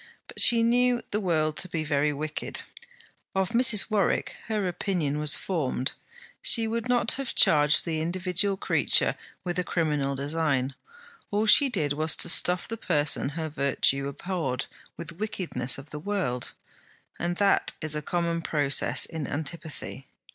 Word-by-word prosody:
But - - -2
she 230 -1 +7
knew 245 +1 +2
the 210 - 0
world 155 -6 0
to 185 - +1
be 165 -2 -2
very 150 0 +1
wicked. 150 +1 -4 0.7
Of 190 -1 +1
Mrs. 230 -3 +4
Warwick, 200 -4 0
her 210 -3 -1
opinion 170 -5 -2
was 150 -1 +2
formed. 140 -8 -2 0.5
She 225 -2 +2
would 230 +2 -3
not 245 -1 +2
have 275 -2 -3
charged 150 0 +5
the 160 -2 -2
individual 185 +3 0
creature - - +2 0.3
with 180 0 -3
a - - 0
criminal 150 -6 -1
design; 140 -2 -1 0.6
all 210 +1 0
she 270 +6 +6
did 150 - -1
was 155 +2 +2
to - - +1
stuff 180 +1 +3
the 230 - -5
person 150 -9 +2
her 160 -1 -2
virtue 140 -1 0
abhorred 140 -4 -3 0.3
with 170 -1 -7
the - - -9
wickedness 185 - -1
of 135 +2 -11
the 150 - -6
world, 180 -9 -2 0.7
and 175 0 -2
that 200 -1 +2
is 155 -1 -1
a 150 - -2
common 170 +1 -2
process 140 -5 +2
in 160 -4 -5
antipathy. 155 -3 -5
165 Hz, 155 wpm, -26 LUFS, 145-195 Hz, 0.7 s, she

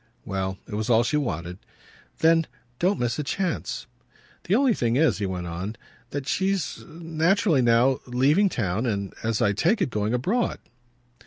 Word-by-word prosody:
Well, 95 -2 -3
it 110 - -9
was 110 +2 -2
all 115 0 +5
she 150 +6 0
wanted. 90 - -3 0.6
"Then 165 0 +4 0.3
don't 190 +3 +2
miss 120 +3 -1
a - - 0
chance." 180 +4 -2 0.6
"The 190 - +2
only 260 0 +4
thing 120 - 0
is," 155 -4 +3
he 100 - -1
went 90 -1 -4
on, 90 +6 -5 0.3
"that 140 -1 -5
she's 190 -2 -1
naturally 165 0 +1
now 120 +2 +4
leaving 140 +11 +3
town 110 - -1
and, 100 -3 -2
as 110 -1 0
I 100 - +3
take 170 - +2
it, - - 0
going 105 +2 0
abroad." 205 - 0
125 Hz, 165 wpm, -25 LUFS, 105-165 Hz, 0.6 s, all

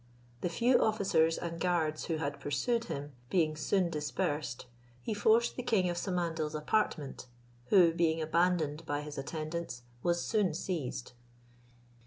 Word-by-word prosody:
The 180 - 0
few 240 +9 +3
officers 190 -7 +2
and 170 -1 -5
guards 160 -4 +1
who 165 - -1
had 145 -2 -3
pursued 230 - 0
him, 145 -5 -5 0.2
being 160 -4 +2
soon 170 +4 +1
dispersed, 150 -4 -2 0.3
he 125 - -3
forced 220 +3 +3
the - - -3
king 195 -7 +2
of - - -3
Samandal's 170 -4 -1
apartment, 150 -5 -1 0.4
who, 175 -5 +6
being 165 -1 +2
abandoned 160 -1 +1
by 145 -1 -1
his 150 -1 -6
attendants, 155 -3 -4 0.2
was 175 +3 +1
soon 205 -8 +1
seized. 135 -10 -3
165 Hz, 140 wpm, -32 LUFS, 150-185 Hz, 0.4 s, who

